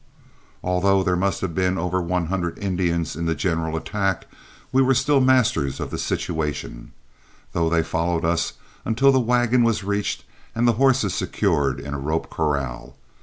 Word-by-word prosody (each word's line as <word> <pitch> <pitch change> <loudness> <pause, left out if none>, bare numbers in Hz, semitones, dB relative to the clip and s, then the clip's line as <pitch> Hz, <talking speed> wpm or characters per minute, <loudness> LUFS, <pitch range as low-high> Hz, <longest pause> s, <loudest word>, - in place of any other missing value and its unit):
Although 95 +2 +2
there 90 -1 +1
must 95 +2 0
have 95 -3 -2
been 95 +1 +1
over 90 +2 -1
one 90 0 -1
hundred 85 -1 -2
Indians 90 -5 -1
in 85 +1 -3
the 80 - +1
general 80 0 -1
attack, 95 +1 -1 0.5
we 130 - +4
were 135 0 +4
still 140 +2 +3
masters 125 - +2
of - - -4
the - - -4
situation, 75 -6 -3 0.6
though 85 -1 +1
they 80 -1 +2
followed 85 +1 -1
us 85 0 0 0.3
until 135 +5 +3
the 130 - +3
wagon 120 0 +2
was 115 -3 +2
reached 100 +1 -2 0.3
and 120 +1 +2
the 120 - +5
horses 130 -8 +3
secured 70 -3 0
in 70 - -6
a 70 - -3
rope 80 +4 -2
corral. 70 -6 -2
90 Hz, 170 wpm, -23 LUFS, 80-110 Hz, 0.6 s, the